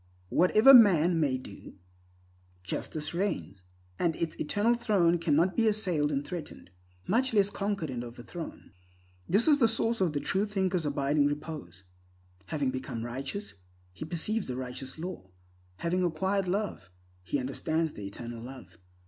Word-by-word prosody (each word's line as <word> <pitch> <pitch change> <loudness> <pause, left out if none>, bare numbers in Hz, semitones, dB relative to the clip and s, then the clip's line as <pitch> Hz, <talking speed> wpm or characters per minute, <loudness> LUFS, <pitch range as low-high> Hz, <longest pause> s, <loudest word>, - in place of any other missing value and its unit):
Whatever 215 - +6
man 180 - +7
may 140 -5 +1
do, 105 -7 -11 0.9
justice 150 - -4
reigns, 100 - -2 0.4
and 170 -2 +1
its 165 -2 -2
eternal 205 +9 +2
throne 200 -8 +2
cannot 165 +3 +2
be 225 -1 +3
assailed 180 -9 +1
and 140 0 -1
threatened, 165 - -8 0.4
much 240 +4 +1
less 200 -1 +4
conquered 195 -7 -2
and 120 -1 -4
overthrown. 120 +8 -9 0.6
This 205 - +3
is 295 -2 +5
the 230 - +5
source 225 0 0
of 175 -5 +2
the 145 - 0
true 195 +7 0
thinker's 190 -5 0
abiding 145 0 +2
repose. 145 - -6 0.6
Having 145 -4 -1
become 125 -3 -5
righteous, 135 - -5 0.4
he 95 - -7
perceives 175 +7 -1
the 125 - -3
righteous 130 +2 -5
law. 165 - -7 0.5
Having 175 - 0
acquired 190 +3 0
Love, 185 - -2 0.3
he 120 - -1
understands 155 +4 -1
the 100 - -7
Eternal 115 +3 -7
Love. 130 -3 -11
165 Hz, 145 wpm, -29 LUFS, 135-195 Hz, 0.9 s, man